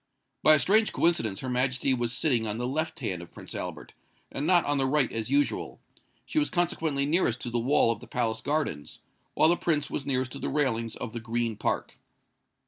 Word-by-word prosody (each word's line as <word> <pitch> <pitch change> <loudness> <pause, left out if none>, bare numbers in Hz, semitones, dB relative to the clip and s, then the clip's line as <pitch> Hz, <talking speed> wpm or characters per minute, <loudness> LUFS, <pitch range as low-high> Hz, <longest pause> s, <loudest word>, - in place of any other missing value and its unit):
By 155 - +7
a - - +4
strange 215 +8 +3
coincidence 115 - +1
Her 130 - -5
Majesty 130 +1 +1
was 120 -2 -1
sitting 125 -4 +1
on 105 +1 -2
the 120 - -3
left 155 +4 -3
hand 95 -8 -3
of 85 - -11
Prince - - -10
Albert, - - -6 0.4
and 145 - -3
not 175 -2 +4
on 145 -1 +1
the 135 - +3
right 135 -2 +2
as 110 0 -3
usual: 145 +1 0 0.5
she 310 - 0
was 300 - 0
consequently 160 -5 0
nearest 145 -6 +2
to 120 - -4
the 120 - 0
wall 120 -1 +3
of 115 - -4
the - - -13
palace 110 -2 -2
gardens, 145 - -3 0.3
while 160 - +5
the 175 - +4
Prince 150 -4 0
was 140 - -3
nearest 130 -2 -1
to 140 - -7
the - - -3
railings 115 -6 0
of 115 - -6
the 120 - -4
Green 115 0 -2
Park. 105 - -3
130 Hz, 215 wpm, -27 LUFS, 115-150 Hz, 0.5 s, By